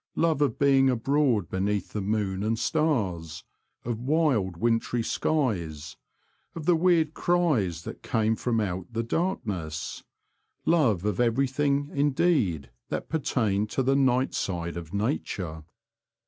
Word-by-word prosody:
Love 160 -3 +1
of 145 - +1
being 135 -1 +4
abroad 125 - +1
beneath 100 +2 -2
the 105 - -2
moon 100 -1 -1
and 110 +2 0
stars; 95 - -1 0.4
of 115 -2 -2
wild 125 - +1
wintry 115 +2 0
skies; 85 - -1 0.6
of 165 -3 -6
the 175 0 +4
weird 165 -2 +3
cries 135 - +1
that - - -8
came 110 0 +1
from 115 0 0
out 95 -1 -3
the 115 0 -2
darkness 105 - -3 0.3
— - - -48
love 110 - +2
of 105 -3 -1
every 120 +3 +3
thing 140 +2 0
indeed 135 - +1 0.2
that - - -4
pertained 110 -9 0
to 130 - 0
the 135 +2 +2
night 130 -1 +2
side 85 -2 -3
of 85 -2 -7
nature. 100 - -2
115 Hz, 135 wpm, -27 LUFS, 95-140 Hz, 0.6 s, being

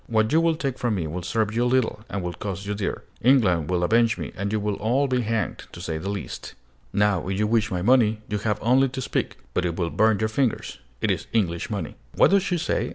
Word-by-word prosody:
What 110 0 +2
you 160 - +5
will 165 -1 +2
take 135 -5 -3
from 120 -3 0
me 90 -4 -2
will 85 +4 -4
serve 110 +4 -1
you 120 - +2
little, 125 -3 +1
and 100 -2 -3
will 90 0 -3
cost 100 0 -5
you 105 - -2
dear. 100 -1 -3 0.2
England 100 - +3
will 90 -1 +1
avenge 115 +4 +3
me, - - -5
and 100 +1 -3
you 110 - +1
will 105 0 -1
all 130 +6 +1
be 130 -1 +1
hanged, 115 -1 -2
to - - -9
say 80 -2 -3
the 95 - -4
least. 100 0 -6 0.4
Now 100 -3 +1
if 95 0 -1
you 105 - +2
wish 110 0 +2
my 90 -4 -2
money, 110 -2 +4
you 105 - -2
have 105 0 0
only 130 +3 +4
to 130 - -6
speak; - - -2 0.2
but 90 - +1
it 85 -2 -1
will 85 -2 -1
burn 110 -1 +3
your 110 - 0
fingers: 120 +1 -1 0.2
it - - +2
is - - -2
English 90 -6 0
money!" 95 -9 -4 0.2
"What - - +5
does 200 0 +5
she 180 -2 -1
say?" 170 - -1
110 Hz, 250 wpm, -24 LUFS, 95-120 Hz, 0.4 s, you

